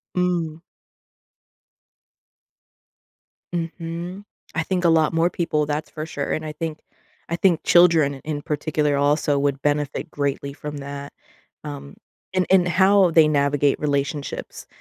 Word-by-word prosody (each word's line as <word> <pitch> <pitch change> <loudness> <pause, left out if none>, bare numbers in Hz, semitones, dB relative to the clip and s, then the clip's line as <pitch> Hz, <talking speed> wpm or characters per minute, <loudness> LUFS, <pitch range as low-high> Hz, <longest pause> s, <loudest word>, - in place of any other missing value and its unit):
Mm. 175 -3 0 2.9
Mhm. 170 +3 -5 0.3
I 165 - +1
think 180 +1 -1
a - - +6
lot 160 -1 +3
more 165 +2 +3
people 155 -4 0
that's 150 +1 -3
for 155 0 -6
sure 145 -3 -4
and 155 - -2
I 155 - -4
think 155 0 -5 0.5
I 170 - 0
think 175 -2 +2
children 165 -5 +5
in 150 -1 -3
particular 150 -1 0
also 145 0 +2
would 140 -1 0
benefit 145 0 -1
greatly 140 -1 -2
from 150 0 -7
that, 140 0 -7 0.5
um, 70 0 -8 0.4
and 185 -1 +2
and 180 -2 +5
how 190 +1 +4
they 160 -1 +6
navigate 145 -1 +2
relationships. 145 0 -3
155 Hz, 130 wpm, -23 LUFS, 145-170 Hz, 2.9 s, a